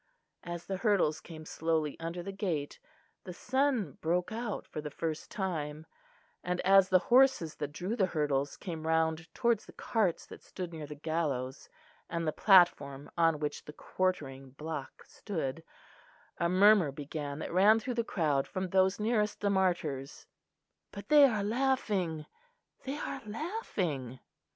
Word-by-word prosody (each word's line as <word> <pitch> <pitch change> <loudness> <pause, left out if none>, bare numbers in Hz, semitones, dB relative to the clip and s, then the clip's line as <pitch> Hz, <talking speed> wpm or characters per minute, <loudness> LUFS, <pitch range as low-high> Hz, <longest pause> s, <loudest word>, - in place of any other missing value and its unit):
As 175 -1 -6
the 195 - -3
hurdles 195 -7 +2
came 155 -2 -10
slowly 160 -2 -1
under 165 +2 -4
the 195 - -5
gate, 175 -8 -3 0.4
the 180 - -8
sun 260 - 0
broke 175 +4 0
out 225 -1 -4
for 150 - -6
the 150 - -5
first 155 +1 -4
time; 155 -5 -3 0.6
and 180 0 -2
as 195 0 +5
the 185 - +6 0.2
horses 260 - +5
that 145 -1 -4
drew 185 +8 -3
the 190 -6 +2
hurdles 145 -4 -1
came 160 -3 -6
round 160 0 0
towards 235 -3 +1
the - - -13
carts 210 -7 0
that - - -12
stood 180 -2 -7
near 155 -2 -6
the 150 - -8
gallows 145 -4 -3 0.4
and 170 0 -2
the 155 - +1
platform 150 -8 +4
on 165 -2 +3
which 150 0 -4
the 150 - -9
quartering 135 -8 -2
block 150 +1 -7
stood, 160 -6 -5 0.8
a 170 - +2
murmur 190 -3 +5
began 145 0 -5
that 160 - -5
ran 205 +5 +6
through 250 +3 -3
the 235 -1 0
crowd 150 -10 0
from 185 -1 -3
those 190 +2 +3
nearest 210 -1 0
the 200 -1 +1
martyrs. 170 -8 -1 0.7
"But 200 - -9
they 295 -2 +8
are 215 -6 +1
laughing, 205 - 0 0.6
they 270 +2 -3
are 275 -2 -5
laughing!" 190 - -3
175 Hz, 155 wpm, -31 LUFS, 150-205 Hz, 0.8 s, they